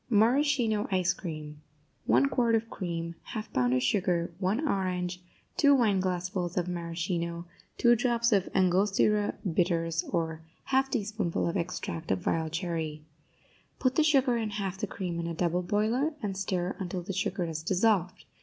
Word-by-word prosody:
MARASCHINO 235 -1 +3
ICE 185 -2 +2
CREAM 155 -4 -7 0.5
1 125 +5 +5
quart 235 - +2
of 225 0 -1
cream 170 -2 -4 0.2
1/2 215 -1 -5
pound 125 -1 +2
of 125 - +1
sugar 175 +3 +1
1 210 +11 0
orange 180 -4 -1 0.4
2 285 -2 +6
wineglassfuls 185 -5 0
of 180 -1 +1
maraschino 170 0 -3 0.3
2 240 0 +5
drops 235 0 +1
of 195 -3 +2
Angostura 195 +3 +3
Bitters, 165 -1 +1
or 160 -2 -1 0.3
1/2 270 0 +3
teaspoonful 210 -9 -1
of 170 - -2
extract 170 -2 -3
of 95 -1 -1
wild 160 -1 0
cherry 160 -3 -3 0.7
Put 255 -1 +1
the 315 - +3
sugar 270 -5 +3
and 220 -2 -2
half 195 -2 -3
the 210 - -1
cream 180 -3 -4
in 170 - -2
a 170 - -3
double 175 +1 +1
boiler, 225 - 0
and 200 -2 -2
stir 185 -1 -2
until 180 -1 -4
the 195 +2 -4
sugar 185 0 -1
is 160 -2 -3
dissolved. 185 +1 +1
185 Hz, 155 wpm, -29 LUFS, 170-215 Hz, 0.7 s, 2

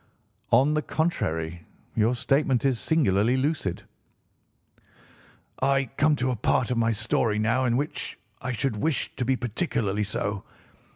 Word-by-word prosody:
"On 135 +6 +4
the 155 - +1
contrary, 85 - -2 0.3
your 115 +3 +2
statement 135 +1 +1
is 130 -4 +2
singularly 125 - +2
lucid." 130 - -1 1.8
"I 135 -1 +2
come 150 0 +3
to 130 -2 0
a - - -1
part 115 +2 +1
of 125 - 0
my 115 0 +2
story 110 0 0
now 120 +4 +1
in 120 -1 +2
which 145 +3 -3 0.2
I 130 - -3
should 120 -1 -1
wish 140 +4 -1
to 125 - 0
be 130 +2 +2
particularly 110 - -1
so. 100 -1 -2
125 Hz, 140 wpm, -26 LUFS, 105-135 Hz, 1.8 s, On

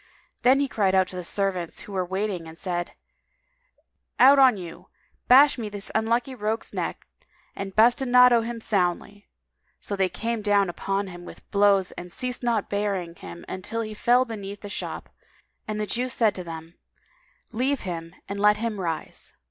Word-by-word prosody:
Then 260 +2 +5
he 280 - +1
cried 195 -6 +1
out 190 -1 +4
to - - -9
the 180 - -5
servants 185 -2 -2
who - - -11
were 185 -2 -1
in - - -18
waiting 190 -3 -2
and 160 0 -11
said, 175 -1 -3 1.2
"Out 275 +2 +7
on 255 -5 +6
you! 175 -3 -9 0.4
Bash 270 +1 +7
me 220 -2 -4
this 205 -1 -4
unlucky 235 +4 0
rogue's 220 -1 -3
neck - - -4 0.5
and 195 -1 -6
bastinado 245 +1 +5
him 230 0 -5
soundly!" 200 0 -1 0.5
So 205 - -4
they 190 -1 +1
came 225 +5 -3
down 205 -3 +2
upon 195 +3 -2
him 175 -2 -10
with - - -13
blows 200 -2 +3
and 175 0 -9
ceased 250 +6 -3
not 235 -4 0
beating 200 -4 -2
him 85 -1 -10 0.2
till 230 +5 -3
he 215 -1 -5
fell 245 +4 +3
beneath 205 -4 -7
the 205 - -8
shop, - - -5 0.6
and 215 0 -3
the 210 - -1
Jew 245 +4 -2
said 225 -4 +2
to 185 - -6
them, 165 0 -9 0.7
"Leave 260 +4 0
him 165 -2 -6
and 200 0 -5
let 210 +1 +4
him 220 -2 -3
rise." 165 -3 -5
205 Hz, 175 wpm, -25 LUFS, 185-230 Hz, 1.2 s, Out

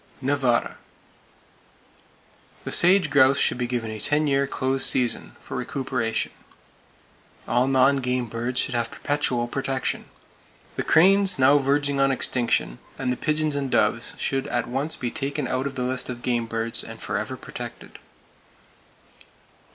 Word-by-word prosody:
Nevada: 135 -3 0 1.9
The - - -5
sage 180 -3 +4
grouse 135 -1 +5
should - - +2
be 120 - -1
given 120 -2 -3
a 110 - -6
ten 145 +8 +2
year 140 -1 +1
close 130 0 -1
season, 120 - +1
for - - -9
recuperation. 130 -4 -2 1.2
All 125 +2 +2
non 135 +1 +4
game 125 -1 -1
birds 120 +2 -2
should - - 0
have 120 -1 -1
perpetual 130 -5 -1
protection. 135 +1 -2 0.7
The - - -2
cranes, 195 +3 +4
now 135 +2 +5
verging 140 0 0
on 135 0 +3
extinction, 120 - 0 0.2
and 130 -2 -1
the - - -3
pigeons 155 +2 -1
and 140 -1 -2
doves 115 +1 0
should 135 -1 -1
at 120 -1 -1
once 135 +6 -2
be 120 -2 -4
taken 140 0 -2
out 130 +2 -1
of 135 - -7
the 125 - -2
list 125 0 -1
of 120 -1 -6
game 120 -2 0
birds, 115 0 -1
and 115 0 -9
forever 110 +5 -3
protected. 120 -2 -9
130 Hz, 145 wpm, -24 LUFS, 120-140 Hz, 1.9 s, grouse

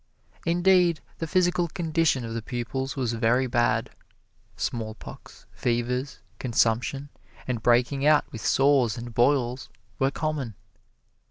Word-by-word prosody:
Indeed, 175 -1 +4 0.2
the 165 - -3
physical 175 0 +2
condition 160 -6 0
of 115 - -5
the 115 - -3
pupils 125 +3 -4
was 125 -4 -1
very 115 +3 +2
bad: 120 -1 +1 0.7
smallpox, 110 -2 -6
fevers, 125 +3 -2 0.2
consumption, 125 +3 0 0.4
and 120 -3 -2
breaking 120 +4 +2
out 150 0 +5
with 115 -6 -7
sores 135 -4 +3
and 120 0 -7
boils, 125 0 +1 0.3
were 135 - +3
common. 140 -7 -3
130 Hz, 115 wpm, -26 LUFS, 120-150 Hz, 0.7 s, out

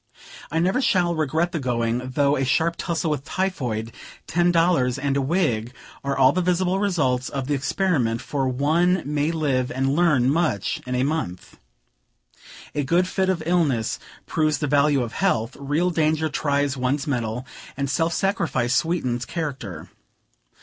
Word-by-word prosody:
I 160 - -2
never 185 +10 +2
shall 180 -8 +2
regret 160 +2 0
the 170 - -2
going, 120 -2 0
though 140 +3 +1
a 135 - 0
sharp 160 +6 +1
tussle 170 -2 -2
with 145 -3 -2
typhoid, 125 - -2 0.3
ten 175 +1 +2
dollars, 165 -8 +2
and 140 0 -1
a 140 - +2
wig, 130 - 0 0.3
are 140 0 -1
all 130 -1 +6
the 185 - 0
visible 180 +1 +1
results 140 -11 0
of 135 -2 -3
the 145 - -1
experiment; 135 -5 0
for 135 +1 -2
one 160 +8 +2
may 150 +2 0
live 140 -6 0
and 135 +2 0
learn 150 -7 +3
much 150 - 0
in 125 - -2
a 125 - +1
month. 135 - -3 1.1
A 145 - -1
good 175 +6 +2
fit 190 0 0
of 175 -4 0
illness 155 -10 +1 0.3
proves 155 -1 +1
the 150 - -2
value 145 -1 +3
of 115 - -6
health; 120 - 0
real 150 +6 0
danger 160 -1 +1
tries 140 -1 0
one's 135 +2 -1
mettle; 120 -3 -2 0.3
and 140 -1 -1
self 165 +4 0
sacrifice 160 - 0
sweetens 130 -6 0
character. 130 - -5
145 Hz, 160 wpm, -23 LUFS, 130-170 Hz, 1.1 s, all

